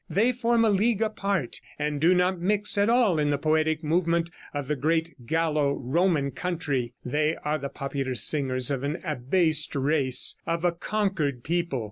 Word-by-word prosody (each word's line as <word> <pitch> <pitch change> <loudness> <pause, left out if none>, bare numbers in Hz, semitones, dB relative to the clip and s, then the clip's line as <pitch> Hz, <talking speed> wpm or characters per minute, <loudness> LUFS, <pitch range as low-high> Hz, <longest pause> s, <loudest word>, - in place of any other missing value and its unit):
They 205 +9 +2
form 235 -1 +1
a 220 - +3
league 215 +2 +2
apart, 200 - -2 0.2
and 150 -1 -2
do 175 +3 +5
not 180 0 +1
mix 205 +3 +2
at 200 +2 +2
all 230 -9 +3
in 150 -1 +1
the 145 - +1
poetic 155 +1 0
movement 170 +1 0 0.2
of 145 -2 -4
the 150 - 0
great 160 -2 -2
Gallo 155 -2 +1
Roman 145 +1 0
country. 140 -7 -3
They 150 +5 0
are 150 +1 0
the 140 0 -5
popular 135 -2 -4
singers 130 +2 +2
of 135 -2 -2
an 145 +5 -3
abased 155 +2 0
race, 140 -2 +2
of 165 +1 -1
a 175 - +3
conquered 170 - -2
people. 170 -4 -1
155 Hz, 170 wpm, -26 LUFS, 140-180 Hz, 0.2 s, do